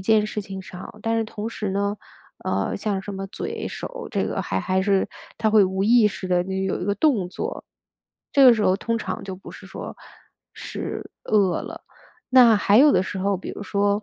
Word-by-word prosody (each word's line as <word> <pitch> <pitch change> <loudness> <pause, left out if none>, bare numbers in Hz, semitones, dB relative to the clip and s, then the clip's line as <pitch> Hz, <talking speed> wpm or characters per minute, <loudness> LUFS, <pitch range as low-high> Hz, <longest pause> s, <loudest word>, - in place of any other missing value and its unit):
件 210 +2 +3
事 215 0 -3
情 190 -1 -7
上， 185 +4 -10
但 225 0 +1
是 225 - 0
同 215 0 -5
时 210 -3 -3
呢， 200 +1 -1 0.5
呃， - - -1
像 205 -3 -2
什 205 - -6
么 195 0 -4
嘴、 - - -5
手， - - -7
这 - - 0
个 - - -2
还 - - -2
还 190 -1 0
是 195 -1 +2 0.3
它 220 - +2
会 210 -1 +6
无 190 +1 -1
意 230 -1 +6
识 190 - -6
地 180 -1 +3
就 190 - -5
有 190 0 -1
一 - - -3
个 200 - 0
动 210 - +2
作， 435 - -5 0.7
这 280 - +5
个 245 -2 +9
时 215 - -1
候 185 - +4
通 230 +2 -1
常 185 -3 -4
就 190 -1 -5
不 195 - -12
是 - - -12
说 - - -7 0.6
是 - - -6
饿 200 -4 +2
了。 - - -8 0.5
那 245 -4 +7
还 205 +2 +4
有 295 +2 +7
的 - - +3
时 190 - -5
候 195 +1 +1
比 185 - -7
如 - - -7
说， 200 +1 +1
205 Hz, 230 characters per minute, -23 LUFS, 190-220 Hz, 0.7 s, 个